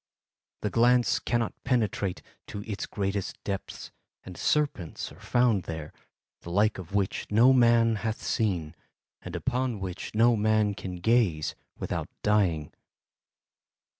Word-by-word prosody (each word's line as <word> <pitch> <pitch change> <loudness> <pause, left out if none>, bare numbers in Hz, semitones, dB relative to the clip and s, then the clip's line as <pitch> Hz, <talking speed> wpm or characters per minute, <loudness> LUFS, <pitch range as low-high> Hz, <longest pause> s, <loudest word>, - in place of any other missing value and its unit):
The 105 - -1
glance 120 0 +4
cannot 120 -1 -1
penetrate 110 -7 0 0.2
to 100 - -6
its 105 -2 -5
greatest 100 -1 -3
depths 100 -1 -5 0.3
and 90 - -9
serpents 140 - -1
are - - -15
found 120 -7 +2
there, 80 -2 -6 0.5
the - - -9
like 105 +3 +2
of 95 +2 -7
which 100 -2 0
no 120 +5 +6
man 115 -2 +4
hath 110 +1 -3
seen, 90 -9 -1 0.5
and - - -7
upon 125 -3 -1
which 95 +2 -6
no 115 +2 +5
man 110 -1 +2
can 95 -2 -6
gaze 90 -5 +2 0.2
without - - -3
dying. 90 -8 +1
105 Hz, 130 wpm, -28 LUFS, 95-115 Hz, 0.5 s, no